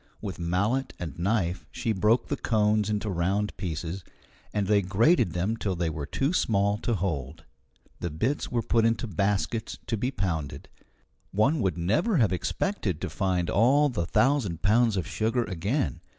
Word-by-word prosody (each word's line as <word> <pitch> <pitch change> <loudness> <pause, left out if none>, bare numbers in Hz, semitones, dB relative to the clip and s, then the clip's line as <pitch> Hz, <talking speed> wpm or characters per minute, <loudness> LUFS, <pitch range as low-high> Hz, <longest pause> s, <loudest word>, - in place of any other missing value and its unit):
With 80 - -6
mallet 100 +10 0
and 80 -3 -6
knife 95 -1 0
she 115 - -2
broke 110 +4 +2
the - - -1
cones 105 -1 +1
into 105 0 -1
round 100 +3 0
pieces, 85 +1 -4 0.5
and 105 -2 0
they 100 +1 +3
grated 100 - +3
them 95 +6 0
till 100 -4 -2
they 85 -2 -1
were 75 -2 -5
too 135 - 0
small 100 - +1
to 120 - -1
hold. 80 -4 -3 0.5
The 85 - -2
bits 115 - -1
were 120 -2 0
put 115 +1 +2
into 115 +1 +1
baskets 105 +3 -1
to 115 0 -1
be 125 +5 -1
pounded. 85 - -3 0.6
One 130 +10 +2
would 95 -7 0
never 115 - +1
have 110 -8 +3
expected 95 - -2
to - - -4
find 90 -3 0
all 135 +10 +4
the 85 -10 -2
thousand 120 - +1
pounds 110 +1 +3
of 90 - -1
sugar 115 +5 0
again. 100 - -2
100 Hz, 165 wpm, -27 LUFS, 90-115 Hz, 0.6 s, all